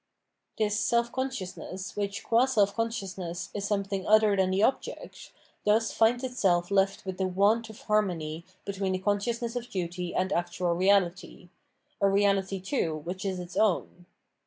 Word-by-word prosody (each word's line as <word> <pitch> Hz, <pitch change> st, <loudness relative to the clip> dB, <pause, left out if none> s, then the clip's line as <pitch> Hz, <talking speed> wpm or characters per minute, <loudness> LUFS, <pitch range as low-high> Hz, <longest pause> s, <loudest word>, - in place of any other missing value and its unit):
This 210 Hz, -1 st, +1 dB
self 235 Hz, 0 st, +1 dB
consciousness, 200 Hz, -7 st, -5 dB
which, 200 Hz, -1 st, -3 dB
qu^ 240 Hz, +3 st, +3 dB
self 205 Hz, -5 st, +3 dB
consciousness, 190 Hz, -5 st, -3 dB
is 200 Hz, -1 st, -3 dB
something 195 Hz, -2 st, -2 dB
other 215 Hz, -1 st, +5 dB
than 190 Hz, -1 st, +2 dB
the 190 Hz, +2 st, +1 dB
object, 265 Hz, -, -2 dB, 0.3 s
thus 220 Hz, +2 st, +2 dB
finds 240 Hz, +3 st, +3 dB
itself 190 Hz, -8 st, +1 dB
left 195 Hz, 0 st, +2 dB
with 190 Hz, 0 st, -5 dB
the 190 Hz, -, +1 dB
want 205 Hz, +5 st, +2 dB
of 220 Hz, -, -12 dB
harmony 170 Hz, -7 st, 0 dB, 0.2 s
between 195 Hz, -1 st, -2 dB
the -, -, +1 dB
consciousness 230 Hz, +5 st, -1 dB
of 245 Hz, 0 st, -4 dB
duty 180 Hz, -1 st, -4 dB
and 185 Hz, +1 st, 0 dB
actual 175 Hz, 0 st, 0 dB
reality, 185 Hz, -1 st, +1 dB, 0.5 s
a 200 Hz, -, +5 dB
reality, 195 Hz, -1 st, +2 dB
too, 180 Hz, -, -1 dB
which 175 Hz, +5 st, -6 dB
is 190 Hz, -2 st, -2 dB
its 180 Hz, 0 st, -8 dB
own. 180 Hz, -4 st, 0 dB
195 Hz, 155 wpm, -28 LUFS, 185-215 Hz, 0.5 s, other